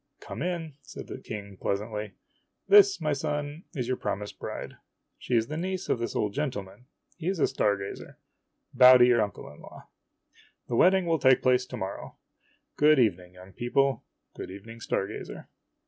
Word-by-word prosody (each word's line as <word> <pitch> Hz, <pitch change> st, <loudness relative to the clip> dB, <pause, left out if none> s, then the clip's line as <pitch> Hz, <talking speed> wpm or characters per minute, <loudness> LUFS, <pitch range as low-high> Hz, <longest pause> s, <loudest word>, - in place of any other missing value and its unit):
"Come -, -, -8 dB
in," 165 Hz, -4 st, -3 dB
said 140 Hz, 0 st, -10 dB
the -, -, -8 dB
King 100 Hz, -5 st, -8 dB
pleasantly. 105 Hz, +1 st, -3 dB, 0.5 s
"This, 400 Hz, -1 st, +7 dB
my 150 Hz, -1 st, 0 dB
son, 145 Hz, +3 st, -4 dB
is 125 Hz, -4 st, -2 dB
your 130 Hz, 0 st, -1 dB
promised 105 Hz, 0 st, -4 dB
bride. -, -, -7 dB, 0.4 s
She 125 Hz, -, -2 dB
is 115 Hz, -1 st, +3 dB
the 155 Hz, +6 st, -5 dB
niece 185 Hz, +2 st, -3 dB
of -, -, +1 dB
this 120 Hz, -, -4 dB
old 105 Hz, -1 st, 0 dB
gentleman. 125 Hz, -4 st, -5 dB, 0.3 s
He 170 Hz, -1 st, -6 dB
is 190 Hz, 0 st, 0 dB
a 155 Hz, -, +3 dB
star 105 Hz, -6 st, +1 dB
gazer. 100 Hz, 0 st, -8 dB, 0.6 s
Bow 125 Hz, 0 st, +9 dB
to 125 Hz, -, +7 dB
your 120 Hz, -2 st, +4 dB
uncle 105 Hz, -1 st, -4 dB
in -, -, -16 dB
law. -, -, -14 dB, 0.8 s
The 120 Hz, -, -2 dB
wedding 185 Hz, +7 st, +4 dB
will 165 Hz, -2 st, +1 dB
take 130 Hz, -1 st, +4 dB
place 125 Hz, 0 st, +3 dB
to 125 Hz, -, -7 dB
morrow. 95 Hz, -3 st, -6 dB, 0.6 s
Good 150 Hz, +1 st, +5 dB
evening, 90 Hz, -7 st, +1 dB
young 90 Hz, +1 st, -14 dB
people. 135 Hz, +3 st, 0 dB, 0.3 s
Good -, -, -7 dB
evening, 110 Hz, +5 st, -10 dB
star 95 Hz, -, -1 dB
gazer." 105 Hz, -, -8 dB
125 Hz, 180 wpm, -27 LUFS, 105-150 Hz, 0.8 s, Bow